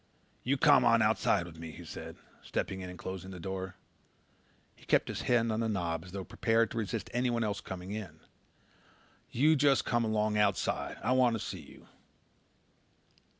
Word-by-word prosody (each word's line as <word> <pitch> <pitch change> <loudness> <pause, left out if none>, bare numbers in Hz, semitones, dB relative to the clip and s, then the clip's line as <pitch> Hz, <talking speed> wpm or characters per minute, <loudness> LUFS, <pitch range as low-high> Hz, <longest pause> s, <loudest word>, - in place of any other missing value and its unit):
"You 135 +3 +1
come 145 -3 +6
on 115 -2 +5
outside 105 -4 +2
with 80 -2 -11
me," 80 0 -7
he 80 - -10
said, - - -8 0.3
stepping 95 0 -3
in 90 - -6
and 90 - -9
closing 95 0 -6
the 95 -2 -8
door. 95 +1 -5 1.0
He - - -21
kept - - +2
his - - -3
hand 115 -2 +2
on 110 - -1
the 115 -1 0
knob 85 -5 -1
as 90 - -11
though 95 0 -4
prepared 115 +2 +1
to 115 - -2
resist 110 +1 -3
anyone 120 -1 +1
else 105 -2 -2
coming 95 +1 -7
in. 105 -2 -6 1.1
"You 150 +6 +4
just 140 -1 +3
come 120 -1 +1
along 110 -1 +1
outside. 100 -3 0
I - - +1
want 125 -2 +4
to - - -3
see - - -5
you." - - -16
110 Hz, 180 wpm, -31 LUFS, 95-120 Hz, 1.1 s, come